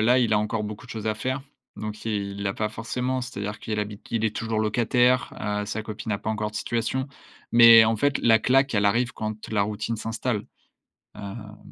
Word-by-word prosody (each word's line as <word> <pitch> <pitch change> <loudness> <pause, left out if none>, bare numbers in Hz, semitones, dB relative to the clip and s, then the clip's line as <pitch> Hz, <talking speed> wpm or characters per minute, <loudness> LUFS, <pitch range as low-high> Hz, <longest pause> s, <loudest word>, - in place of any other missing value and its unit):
là, 120 +4 +4
il 120 -3 +2
a 105 - +4
encore 105 +1 -1
beaucoup 105 0 -7
de - - -13
choses 110 -1 -5
à 110 - +1
faire. 130 +5 -3 0.3
Donc 105 0 -6
il 100 -2 -3
l'a 95 -1 -1
pas 110 - -1
forcément, 125 +4 -3
c'est-à-dire 105 -4 -5
qu'il 105 -1 -3
habite 105 -1 -6
il 115 -1 0
est 110 -1 0
toujours 110 -1 -1
locataire, 120 +3 +2
heu, 105 0 -2
sa 110 +1 -3
copine 110 +1 -6
n'a 100 - 0
pas 105 - -3
encore 105 -1 -2
de 110 - -6
situation. 120 +5 -2 0.4
Mais 115 -1 +9
en 110 0 +1
fait, 145 +5 +1
la 115 -1 +5
claque, 135 +4 +3
elle 100 -1 +2
arrive 120 +4 +2
quand 110 0 -5
la 105 -2 +2
routine 105 +2 -3
s'installe. 110 0 -3 0.7
Hem, 105 +1 -8
110 Hz, 210 wpm, -25 LUFS, 105-115 Hz, 0.7 s, Mais